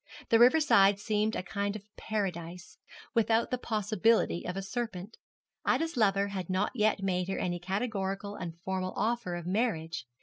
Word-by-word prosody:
The 225 - +5
river 250 +7 +7
side 200 -10 +5
seemed 215 +1 0
a - - -2
kind 200 +2 -2
of 205 -1 -8
Paradise, 180 -5 -4 0.3
without 230 0 +2
the 250 - 0
possibility 215 -3 +1
of 180 +1 -3
a 195 - -3
serpent. 215 -2 -4 0.5
Ida's 325 -1 +1
lover 200 -3 +2
had 190 -3 -5
not 185 +2 +1
yet 215 -4 +1
made 180 -2 0
her 195 - -2
any 175 -1 -2
categorical 195 +1 -3
and 170 -4 -6
formal 185 0 -3
offer 225 -5 -1
of 175 -1 -6
marriage. 175 - -1
200 Hz, 165 wpm, -30 LUFS, 185-225 Hz, 0.5 s, river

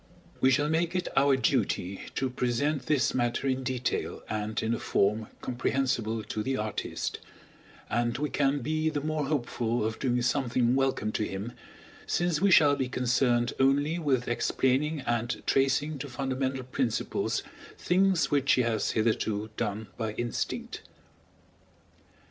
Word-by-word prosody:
We 130 - +5
shall 145 +3 +3
make 165 +3 0
it 180 - -1
our 135 0 +5
duty 100 -7 0
to 130 -1 -1
present 130 +4 -1
this 145 -4 +2
matter 120 +1 0
in 130 -1 +1
detail 125 -1 -2
and 110 0 -2
in 110 +1 +1
a - - -2
form 105 +2 +1
comprehensible 120 -3 -1
to 110 - -4
the 130 +4 -1
artist; 105 -2 -3 0.7
and 120 0 0
we 150 +2 -2
can 140 0 +1
be 155 +4 0
the 150 -2 -2
more 155 -1 -1
hopeful 120 -5 -1
of 110 +1 -3
doing 125 -2 +1
something 125 -1 +1
welcome 135 -5 +1
to 105 - -1
him, 100 +3 -4 0.6
since 175 -2 +1
we 200 - +4
shall 155 -6 +6
be 130 -2 -2
concerned 125 -1 +1
only 145 +5 +3
with 135 -6 +1
explaining 135 +5 +1
and 120 -1 -2
tracing 135 +2 +1
to 140 - -5
fundamental 130 0 -2
principles 125 -2 -1 0.3
things 185 0 +2
which 140 -2 +3
he 125 - +3
has 115 -2 0
hitherto 110 -1 0
done 110 -1 -2
by 110 -2 -2
instinct. 120 +1 -3
130 Hz, 145 wpm, -28 LUFS, 120-145 Hz, 0.7 s, shall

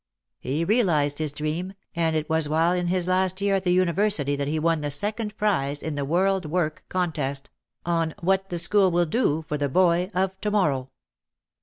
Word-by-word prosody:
He 150 +6 -2
realised 165 -10 +2
his 155 -2 -1
dream, 155 +6 -4 0.2
and 165 -1 +1
it 155 -1 -1
was 160 -2 +1
while 165 +3 +2
in 180 -1 -1
his 180 0 0
last 185 0 +1
year 200 0 +1
at 195 -1 0
the 180 - +1
university 180 -4 +2
that 140 0 -3
he 155 +2 -1
won 165 0 +1
the 145 - -2
second 210 +6 0
prize 145 -9 0
in 160 - -3
the 145 -1 -2
"World 185 +4 +1
Work" 155 -1 -2
contest 150 -7 -2 0.3
on 165 -2 0
"What 190 +2 0
the 175 - -3
School 190 +3 +3
Will 175 0 +2
Do 160 - 0
for 150 - -3
the 145 -1 0
Boy 180 +3 +2
of 190 +1 -1
To 210 - -1
morrow." 145 -11 0
170 Hz, 195 wpm, -24 LUFS, 150-190 Hz, 0.3 s, School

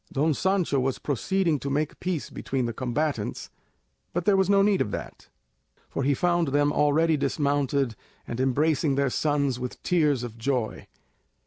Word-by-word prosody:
Don 150 +3 +2
Sancho 185 -4 +1
was 130 0 0
proceeding 165 - 0
to 140 - -4
make 150 +2 -1
peace 180 -4 -3
between 130 -2 -2
the 115 - -3
combatants, 130 -1 -2 0.6
but 175 0 -2
there 205 - +4
was 190 -1 +2
no 200 0 +5
need 200 -1 +3
of - - 0
that, - - -7 0.6
for - - -3
he 140 +1 +2
found 175 +1 +1
them 145 +1 +2
already 155 +2 +3
dismounted 140 -4 0 0.3
and 120 - -5
embracing 140 +2 +2
their 140 -1 +1
sons 140 -4 0
with 125 0 -5
tears 150 -8 +2
of 115 -1 -7
joy. 125 -3 -2
145 Hz, 160 wpm, -26 LUFS, 130-160 Hz, 0.6 s, no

